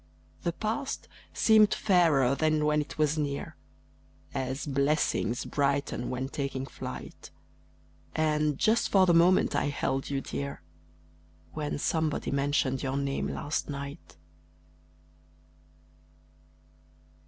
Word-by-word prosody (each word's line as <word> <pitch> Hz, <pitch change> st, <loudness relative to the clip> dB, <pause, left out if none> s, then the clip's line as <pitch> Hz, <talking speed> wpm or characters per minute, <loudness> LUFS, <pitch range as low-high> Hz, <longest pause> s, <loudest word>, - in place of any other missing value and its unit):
The 170 Hz, -, -1 dB
past 230 Hz, +8 st, -3 dB, 0.2 s
seemed 215 Hz, -1 st, +5 dB
fairer 160 Hz, -10 st, +3 dB
than 155 Hz, +1 st, +1 dB
when 150 Hz, 0 st, +3 dB
it 150 Hz, -, -8 dB
was 155 Hz, 0 st, +1 dB
near, 140 Hz, -1 st, -3 dB, 0.8 s
As 130 Hz, +1 st, -3 dB
"Blessings 140 Hz, -4 st, 0 dB
brighten 140 Hz, -3 st, -1 dB
when 130 Hz, +1 st, -2 dB
taking 135 Hz, -1 st, -3 dB
flight;" -, -, -8 dB, 0.9 s
And 150 Hz, -2 st, +1 dB
just 225 Hz, +1 st, +2 dB
for 190 Hz, -2 st, +5 dB
the 175 Hz, -, +4 dB
moment 175 Hz, +2 st, +4 dB
I -, -, +1 dB
held 135 Hz, -2 st, -1 dB
you 140 Hz, -1 st, -1 dB
dear 140 Hz, -3 st, -5 dB, 0.9 s
When 150 Hz, -2 st, -3 dB
somebody 155 Hz, 0 st, -1 dB
mentioned 140 Hz, -1 st, +1 dB
your 135 Hz, 0 st, -2 dB
name 140 Hz, -1 st, -1 dB
last 150 Hz, +1 st, -3 dB
night. 140 Hz, -, -7 dB
145 Hz, 110 wpm, -29 LUFS, 140-160 Hz, 0.9 s, seemed